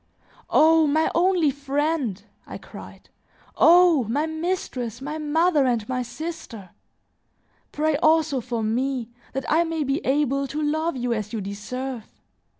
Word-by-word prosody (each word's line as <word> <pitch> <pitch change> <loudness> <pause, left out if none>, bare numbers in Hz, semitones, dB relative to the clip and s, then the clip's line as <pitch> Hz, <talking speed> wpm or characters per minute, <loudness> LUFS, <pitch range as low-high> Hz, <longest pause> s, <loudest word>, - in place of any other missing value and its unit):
"O 320 0 +5
my 310 +2 +1
only 345 -3 +3
friend!" 280 - -2 0.2
I - - -7
cried. - - -13 0.5
"Oh! 340 -5 +5
my 280 +8 0
mistress, 315 - -3
my 300 +4 -5
mother, 305 -1 +2
and 235 -4 -1
my 255 -1 -2
sister! 240 - -7 1.0
Pray 305 0 0
also 310 -3 +2
for 235 -1 -3
me, 245 +2 -1 0.2
that 270 +1 -3
I 320 +2 +3
may 325 -2 -2
be 275 +4 -1
able 275 0 +1
to 300 +3 -5
love 310 0 -1
you 245 -1 -1
as 215 -1 -4
you 225 - -2
deserve. 220 +5 -6
285 Hz, 140 wpm, -24 LUFS, 245-315 Hz, 1.0 s, O